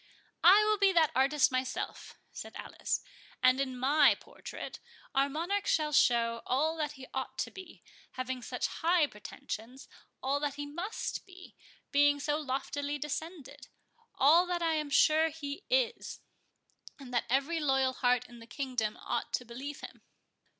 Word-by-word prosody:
"I 390 +5 +8
will 425 -1 +2
be 395 -1 +5
that 325 -3 +4
artist 275 +2 +3
myself" 255 0 -3
said - - -9
Alice; - - -3 0.4
"and, 255 +1 +5
in 260 -2 -3
my 280 +5 +5
portrait, - - -9 0.3
our 275 0 +2
Monarch 350 +8 -2
shall 305 -2 +2
show 230 -4 +3
all 305 +6 +1
that 300 -2 -2
he 265 -2 -11
ought - - -4
to - - -2
be, 375 -3 -12 0.3
having 255 0 -4
such - - -3
high 335 -1 +2
pretensions—all 255 +4 -6
that 285 -1 -2
he 290 0 -5
must 345 +9 -4
be, 370 -1 -14 0.4
being 285 0 +4
so 295 +1 0
loftily 285 +1 -3
descended—all 300 - -1
that 350 -1 -1
I 325 -1 +2
am 305 -2 -1
sure 310 +3 +4
he 300 +3 -7
is, - - 0 0.8
and 265 -4 -11
that 240 - +1
every 275 +6 +1
loyal 270 -3 +2
heart 250 -1 +1
in 240 -1 -13
the 230 - -13
kingdom 245 -4 -2
ought - - -2
to 250 - -1
believe 265 +5 -7
him." - - -10
285 Hz, 150 wpm, -31 LUFS, 260-320 Hz, 0.8 s, I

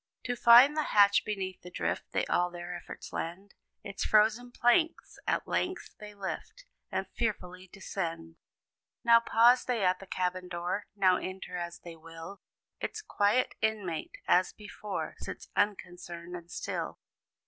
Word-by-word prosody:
To 245 - -2
find 245 +5 +8
the 310 - +2 0.2
hatch 200 0 +6
beneath 190 -3 -4
the 180 - -10
drift, - - -2
They - - 0
all 180 0 +1
their 175 0 -7
efforts 175 - -9
lend, 185 +4 -5 0.3
Its 200 -2 -4
frozen 220 +3 +3
planks 245 +8 +2
at - - 0
length 365 0 -2
they 210 0 -10
lift, 205 - -6 0.3
And - - -1
fearfully 185 -5 -3
descend. 165 -4 -5 0.7
Now 235 -1 +7
pause 235 +2 +5
they 240 -5 -1
at 180 0 +2
the 195 - -11
cabin 180 0 -2
door; 175 +3 -3
Now 185 -2 +4
enter, 185 -1 -6
as 175 -1 -5
they 170 -1 -9
will; 165 +4 -10 0.4
Its 440 - -4
quiet 210 - +2
inmate, 205 -7 -2
as 185 +1 +4
before, 210 -1 -6
Sits - - -8
unconcerned 175 -4 -2
and 170 -1 -9
still. - - -4
195 Hz, 150 wpm, -30 LUFS, 175-220 Hz, 0.7 s, find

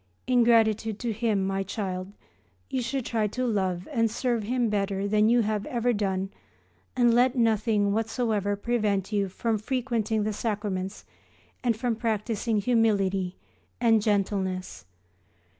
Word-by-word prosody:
In 250 -1 +4
gratitude 220 -2 +3
to 235 -1 -2
Him, 210 -3 0
my 195 0 -1
child, 190 -1 -4 0.6
you 260 -2 0
should 255 +1 -2
try 220 -3 0
to 255 +5 -2
love 190 -6 -1
and 230 -5 +2
serve 235 +1 -1
Him 240 +3 0
better 200 -1 -1
than 210 +1 +3
you 240 0 +4
have 210 -1 -1
ever 245 0 0
done 195 -2 -1 0.6
and 240 -2 +4
to - - +3
let 250 +2 +4
nothing 215 -3 +2
whatsoever 220 -2 0
prevent 205 -3 -1
you 200 -2 +1
from 220 +3 -1
frequenting 230 -2 -1
the 215 0 -1
sacraments 205 -3 -3 0.6
and 235 -3 +1
from 240 0 -1
practising 220 0 -1
humility 200 -5 +1 0.4
and 225 -2 +4
gentleness. 190 - -1
215 Hz, 140 wpm, -27 LUFS, 200-235 Hz, 0.6 s, In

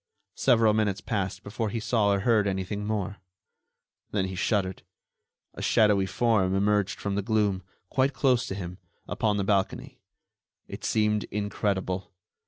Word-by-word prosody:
Several 115 -4 +4
minutes 105 -2 +1
passed 100 -3 -3
before 110 +2 -3
he 115 - -3
saw 110 -2 +1
or 100 -1 +1
heard 110 -2 +3
anything 100 +2 -2
more. 100 -2 -2 0.9
Then 100 -2 0
he - - -5
shuddered; 95 -1 0 0.7
a - - -8
shadowy 105 -3 +3
form 95 -3 +2
emerged 100 0 +1
from 100 - -2
the 100 - 0
gloom, 105 -2 +1 0.3
quite 135 +1 +2
close 130 -3 +2
to 95 - -4
him, 90 -1 -6 0.3
upon 105 -2 0
the 100 - 0
balcony. 100 -1 -1 0.7
It - - -8
seemed 105 -1 +1
incredible. 100 -2 -2
105 Hz, 145 wpm, -27 LUFS, 95-110 Hz, 0.9 s, Several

